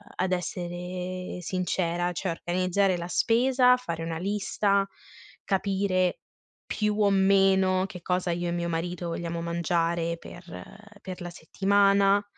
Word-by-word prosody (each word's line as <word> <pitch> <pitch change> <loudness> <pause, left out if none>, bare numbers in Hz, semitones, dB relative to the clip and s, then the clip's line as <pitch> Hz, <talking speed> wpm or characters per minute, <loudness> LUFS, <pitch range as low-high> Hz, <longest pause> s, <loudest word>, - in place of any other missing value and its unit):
ad 185 0 -1
essere 180 +1 -4
sincera, 175 -1 -1
cioè 185 +2 -3
organizzare 185 +3 +1
la 170 0 -5
spesa, 250 +6 +4
fare 170 -10 -5
una 165 0 -3
lista, 200 +1 0 0.6
capire 190 -2 0 0.5
più 210 0 -1
o 200 - +5
meno 190 -1 +4
che 180 -2 -10
cosa 180 0 0
io 175 +1 -2
e - - -1
mio 170 0 -2
marito 170 +1 -3
vogliamo 170 0 -3
mangiare 170 0 0
per 175 +1 -12 0.6
per 185 -1 -7
la 175 - -5
settimana, 200 +3 +3
185 Hz, 125 wpm, -27 LUFS, 175-195 Hz, 0.6 s, o